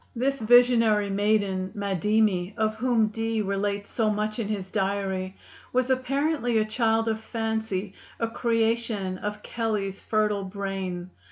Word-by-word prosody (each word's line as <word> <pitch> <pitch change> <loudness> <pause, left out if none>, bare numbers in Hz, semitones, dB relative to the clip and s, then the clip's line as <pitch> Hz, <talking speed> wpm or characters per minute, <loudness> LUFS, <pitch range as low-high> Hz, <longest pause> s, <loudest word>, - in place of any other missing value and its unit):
This 270 +2 0
visionary 230 -3 +5
maiden 200 -2 +1
Madimi, 200 -1 +1
of 215 0 +1
whom 230 -2 +2
Dee 225 +1 -2
relates 200 +1 -2
so 220 -2 +1
much 215 +1 -1
in 220 - -1
his 195 -3 -4
diary, 195 -2 -1 0.4
was 255 +1 +2
apparently 260 -1 +1
a 215 - +3
child 225 0 +1
of 220 0 -1
fancy, 220 -4 -2 0.3
a 230 - +1
creation 225 -4 0
of 210 0 -5
Kelley's 210 -4 -2
fertile 210 -2 +1
brain. 190 -2 -4
215 Hz, 135 wpm, -26 LUFS, 195-225 Hz, 0.4 s, visionary